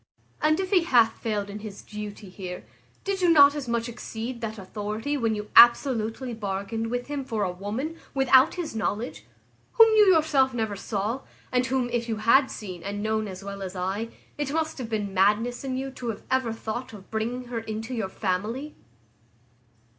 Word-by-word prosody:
And 310 Hz, +2 st, +3 dB
if 380 Hz, 0 st, -2 dB
he 360 Hz, -4 st, +4 dB
hath 235 Hz, -7 st, +4 dB
failed 210 Hz, -3 st, -1 dB
in 205 Hz, +1 st, -7 dB
his 210 Hz, -2 st, -9 dB
duty 210 Hz, -1 st, -7 dB
here, 185 Hz, -1 st, -7 dB, 0.4 s
did 390 Hz, -1 st, -2 dB
you 355 Hz, -, +4 dB
not 285 Hz, -3 st, +8 dB
as 290 Hz, -3 st, -5 dB
much 235 Hz, 0 st, -1 dB
exceed 235 Hz, 0 st, -6 dB
that 220 Hz, -1 st, -4 dB
authority 210 Hz, +7 st, -3 dB
when 225 Hz, -5 st, 0 dB
you 210 Hz, 0 st, -6 dB
absolutely 240 Hz, 0 st, +5 dB
bargained 210 Hz, +1 st, -3 dB
with 245 Hz, +1 st, -2 dB
him 290 Hz, -1 st, -4 dB
for 225 Hz, -5 st, -2 dB
a 185 Hz, -, 0 dB
woman, 220 Hz, -, -4 dB, 0.2 s
without 265 Hz, -1 st, +5 dB
his 345 Hz, -9 st, -4 dB
knowledge, 220 Hz, +2 st, -3 dB, 0.5 s
whom 455 Hz, -1 st, +8 dB
you 420 Hz, -1 st, +7 dB
yourself 290 Hz, -6 st, +3 dB
never 220 Hz, -3 st, -1 dB
saw, 210 Hz, +5 st, -2 dB, 0.3 s
and 255 Hz, 0 st, +2 dB
whom, 260 Hz, -1 st, 0 dB
if 235 Hz, -1 st, -1 dB
you 225 Hz, -, 0 dB
had 235 Hz, +6 st, +4 dB
seen 185 Hz, -5 st, -7 dB
and 205 Hz, +2 st, -4 dB
known 220 Hz, 0 st, 0 dB
as 190 Hz, 0 st, -8 dB
well 200 Hz, 0 st, -6 dB
as 190 Hz, -1 st, -5 dB
I, 190 Hz, +5 st, -2 dB, 0.3 s
it 290 Hz, -2 st, -1 dB
must 320 Hz, -1 st, -1 dB
have 240 Hz, -3 st, -5 dB
been 205 Hz, -3 st, -2 dB
madness 210 Hz, +7 st, +2 dB
in 260 Hz, -1 st, -2 dB
you 270 Hz, +1 st, -4 dB
to 250 Hz, -2 st, -7 dB
have 220 Hz, -, -5 dB
ever 260 Hz, -3 st, +2 dB
thought 225 Hz, +2 st, -5 dB
of 195 Hz, -2 st, -13 dB
bringing 230 Hz, +3 st, -2 dB
her 235 Hz, -2 st, -2 dB
into 225 Hz, +2 st, -5 dB
your 220 Hz, -6 st, -2 dB
family? 215 Hz, +10 st, -2 dB
225 Hz, 190 wpm, -26 LUFS, 210-265 Hz, 0.5 s, not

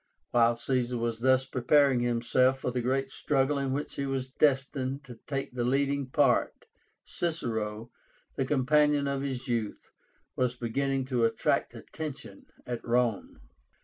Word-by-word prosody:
While 120 Hz, 0 st, +4 dB
Caesar 125 Hz, 0 st, -1 dB
was 115 Hz, -1 st, -2 dB
thus 130 Hz, +1 st, +3 dB
preparing 135 Hz, +1 st, +3 dB
himself 120 Hz, +2 st, +2 dB
for 125 Hz, -, -1 dB
the 125 Hz, 0 st, -1 dB
great 135 Hz, +2 st, -1 dB
struggle 140 Hz, 0 st, +1 dB
in 135 Hz, -1 st, -1 dB
which 145 Hz, +3 st, -3 dB
he 140 Hz, -, -2 dB
was 135 Hz, -1 st, -3 dB
destined 135 Hz, -1 st, 0 dB
to 120 Hz, -4 st, -12 dB
take 135 Hz, -2 st, -3 dB
the 125 Hz, -1 st, -2 dB
leading 140 Hz, +2 st, +1 dB
part, -, -, +2 dB, 0.4 s
Cicero, 115 Hz, -9 st, -3 dB, 0.4 s
the 135 Hz, -, 0 dB
companion 145 Hz, +1 st, +3 dB
of 140 Hz, -1 st, -1 dB
his 135 Hz, -2 st, -4 dB
youth, 115 Hz, -4 st, -3 dB, 0.4 s
was 125 Hz, -1 st, 0 dB
beginning 135 Hz, +3 st, -1 dB
to 125 Hz, -3 st, 0 dB
attract 115 Hz, -, +1 dB
attention 155 Hz, -4 st, -8 dB, 0.2 s
at 120 Hz, -1 st, -5 dB
Rome. 120 Hz, -, 0 dB
130 Hz, 145 wpm, -29 LUFS, 120-140 Hz, 0.4 s, While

